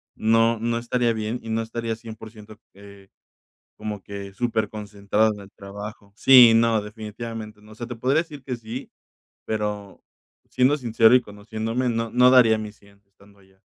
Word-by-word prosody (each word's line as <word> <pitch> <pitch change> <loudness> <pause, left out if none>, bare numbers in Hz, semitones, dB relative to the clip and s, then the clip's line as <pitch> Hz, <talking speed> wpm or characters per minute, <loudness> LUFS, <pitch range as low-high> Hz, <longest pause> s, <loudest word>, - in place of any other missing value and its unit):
no 115 +1 +2
no 115 +1 -1
estaría 120 0 0
bien 110 +2 -3
y 115 - -9
no 110 +1 0
estaría 115 0 -4
100%, 110 -1 -12
eh, 100 0 -15 0.7
como 105 -2 -6
que 100 -1 -8
súper 115 -1 -1
concentrado 105 +1 -1
en 105 - -11
el 100 -1 -13
trabajo. 100 +1 -10
Sí, 125 -4 +8
no, 115 -1 +3
definitivamente, 110 0 -8
no, 105 0 -17
o - - -13
sea, 120 +1 -7
te 125 - -6
podría 135 +7 +1
decir 145 -5 -12
que 125 -2 -4
sí, 115 +3 -8 0.5
pero 105 -2 -4 0.5
siendo 130 +3 +3
sincero 115 -2 +4
y 125 - +5
conociéndome, 110 +4 -4
no 115 -1 -2
no 125 +1 +5
daría 115 -4 +6
mi 105 -1 -6
100 100 -1 -23
estando 100 +1 -23
allá. 95 0 -26
110 Hz, 170 wpm, -23 LUFS, 105-115 Hz, 0.7 s, Sí